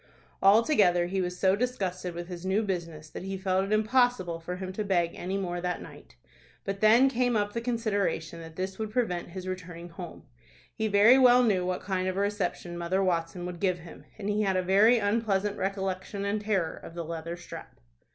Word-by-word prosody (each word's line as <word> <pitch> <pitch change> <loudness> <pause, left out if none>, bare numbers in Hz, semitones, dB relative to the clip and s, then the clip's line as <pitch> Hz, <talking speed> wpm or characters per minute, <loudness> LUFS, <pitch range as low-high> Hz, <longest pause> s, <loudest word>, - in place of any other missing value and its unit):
Altogether 200 - +5
he 190 +2 -1
was 180 0 -3
so 190 +1 +3
disgusted 190 -7 -2
with 175 0 -6
his 175 -1 -7
new 190 +4 +1
business, 170 -6 -4
that - - -8
he 195 +1 -4
felt 190 0 0
it 200 - -6
impossible 215 -5 +2
for 175 +2 -5
him 185 0 -6
to 215 - -2
beg 175 -4 +1
any 190 +2 -3
more 175 -2 -3
that 180 0 -2
night. - - -13 0.5
But 195 0 -3
then 225 +5 +6
came 245 -2 +1
up 205 0 -1
the 230 - -2
consideration 205 -9 -1
that 160 -1 -11
this 190 +2 -4
would 220 -1 -2
prevent 210 -8 -1
his 185 +1 -7
returning 175 -2 -6
home. 175 0 -9 0.5
He 220 - -1
very 215 +5 +6
well 250 -1 +7
knew 190 -6 +2
what 180 0 -2
kind 185 -1 -1
of 185 0 -2
a - - +1
reception 180 -4 -2
Mother 185 +3 0
Watson 175 -1 -1
would 180 -1 -6
give 185 -2 +1
him, 170 -1 -13
and 205 -2 -5
he 210 +1 +1
had 190 -3 +1
a 185 - +1
very 205 +6 +5
unpleasant 205 -2 0
recollection 195 0 -3
and 205 +1 -1
terror 195 -6 0
of 165 - -11
the 170 -1 -4
leather 165 +1 -5
strap. 175 - -11
190 Hz, 205 wpm, -28 LUFS, 175-210 Hz, 0.5 s, well